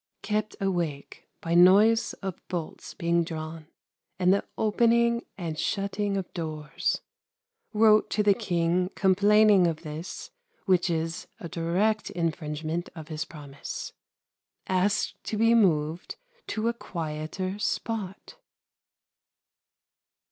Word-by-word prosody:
Kept 215 0 -1
awake 170 -7 -3
by 165 - -2
noise 200 +6 +6
of 190 -3 -4
bolts 175 -3 -5
being 170 0 +1
drawn, 160 -1 -6 0.5
and 185 0 +4
the 200 - +1
opening 235 +2 +3
and 165 -4 -4
shutting 200 0 -1
of 190 -2 -5
doors. 155 -2 -2 0.7
Wrote 215 0 +5
to 210 - +1
the 205 -1 +5
King 180 -4 0
complaining 200 0 +5
of 160 -1 -3
this 155 +2 -7 0.3
which 185 -2 +3
is 165 0 -2
a 170 - -6
direct 180 +6 0
infringement 160 -1 -3
of 160 -1 -9
his 155 0 -3
promise. 145 -4 -8 0.7
Asked 190 +3 0
to 215 - -2
be 230 +2 +4
moved 165 -6 +2 0.3
to 220 +1 -1
a 235 - +2
quieter 170 0 -4
spot. 210 - -3
180 Hz, 110 wpm, -27 LUFS, 165-210 Hz, 0.7 s, noise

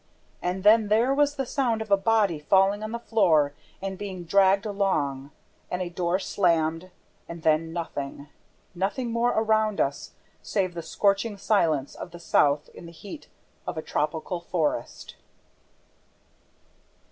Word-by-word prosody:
And 180 +1 -2
then 215 +1 +6
there 230 +6 +3
was 290 +1 +2
the 270 -2 -2
sound 240 -3 0
of 220 -2 -6
a - - +8
body 200 -4 +2
falling 195 +6 +3
on 215 0 -5
the 235 - -2
floor 165 -11 +2 0.3
and 190 -1 -4
being 190 -3 -6
dragged 195 +3 +3
along 150 -10 -1 0.4
and 180 - -2
a 180 -1 -3
door 175 +1 0
slammed 170 -3 0 0.4
and 170 -1 -8
then 160 +1 +2
nothing, 145 -4 -5 0.5
nothing 200 +7 -2
more 235 +1 +2
around 220 -2 +1
us 140 +1 -2 0.3
save 185 -3 -1
the 170 - -5
scorching 200 +6 0
silence 165 -9 +1
of - - -8
the 175 0 -11
south 145 -3 +2
in 170 - -12
the - - -10 0.2
heart 305 - -9 0.4
of 170 - -4
a 155 - -3
tropical 160 +4 -2
forest! 160 -8 -3
190 Hz, 145 wpm, -26 LUFS, 165-215 Hz, 0.5 s, a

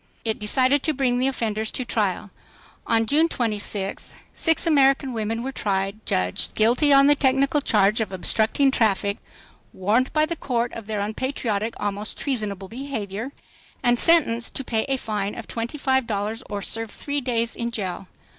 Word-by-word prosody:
It 220 -1 -1
decided 260 +6 +3
to 310 - 0
bring 250 -2 +1
the 260 - +2
offenders 220 -4 -2
to 255 - -3
trial. 205 -3 -1 0.6
On 225 0 +2
June 310 +7 +3
26, 210 -5 -3 0.2
six 325 -1 +2
American 275 -4 +3
women 225 +1 -2
were 265 - -3
tried, 200 -2 -2
judged 90 0 -1
guilty 245 +7 +3
on 275 0 +7
the 290 - +6
technical 275 +1 +2
charge 210 -3 +3
of 215 - -3
"obstructing 220 +8 +2
the - - -2
traffic," 200 -2 +1 0.5
warned 215 +7 +1
by 305 0 +3
the 335 +2 -4
court 240 -5 -2
of 225 -3 -8
their 215 -2 -2
"unpatriotic, 220 -1 -2
almost 205 +1 -3
treasonable 210 -8 -2
behavior," 230 -2 -5 0.5
and 240 0 +3
sentenced 260 -9 +4
to 270 - -2
pay 220 -3 -1
a 270 -1 -1
fine 210 -4 -3
of 230 - -8
twenty 235 +5 -4
five 265 -3 +1
dollars 215 +2 -2
or 205 -1 -4
serve 225 0 -3
three 285 +6 -3
days 235 -3 -1
in 235 0 -3
jail. 195 -4 -4
230 Hz, 170 wpm, -23 LUFS, 210-270 Hz, 0.6 s, on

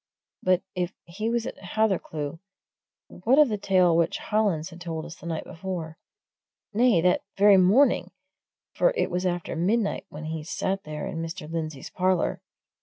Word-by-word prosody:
But 185 -1 +2
if 180 -1 -2
he 210 +6 -3
was 235 0 0
at - - -6
Hathercleugh, 175 -7 -1 0.7
what 235 +9 +1
of 300 -3 +7
the 210 - -1
tale 185 -4 +4
which 170 0 +2
Hollins 195 -6 0
had 170 +1 -12
told 165 -2 -4
us 165 0 -9
the - - -10
night 160 -2 -3
before? 165 -2 -6 0.7
nay, 225 -5 +4
that 180 +1 +3 0.2
very 200 0 +7
morning, 200 +10 +4 0.6
for - - +2
it - - 0
was 180 +1 0
after 175 -2 -2
midnight 200 +6 0
when 155 +1 -8
he 160 0 -4
sat 190 +4 -2
there 150 0 -5
in 165 - -4
Mr. 165 -2 -6
Lindsey's 155 -4 -5
parlour. 185 -1 +1
180 Hz, 165 wpm, -26 LUFS, 165-205 Hz, 0.7 s, of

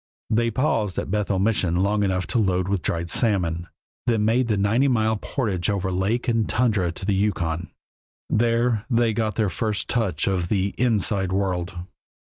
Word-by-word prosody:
They 115 +1 +2
paused 115 -5 0
at - - -3
Bethel 105 -1 0
Mission 95 -4 +1
long 100 +3 +1
enough 95 -2 0
to 120 - +3
load 95 -3 +1
with 100 -2 0
dried 85 0 -1
salmon, 85 -4 +1 0.4
then 110 -3 +2
made 120 +3 +2
the 105 -3 +1
ninety 110 +7 +2
mile 110 -4 +2
portage 105 -5 -2
over 95 -2 -1
lake 100 +6 -1
and 115 -3 +1
tundra 105 -8 +1
to 90 - -8
the 100 - +1
Yukon. 90 -4 -1 0.6
There 115 -1 +1
they 115 -2 +2
got 110 -1 -1
their 105 -4 0
first 105 +2 -2
touch 95 -10 0
of 90 -3 -1
the 100 -1 0
"inside" 105 -5 +1
world. 95 -2 -1
100 Hz, 170 wpm, -23 LUFS, 95-115 Hz, 0.6 s, to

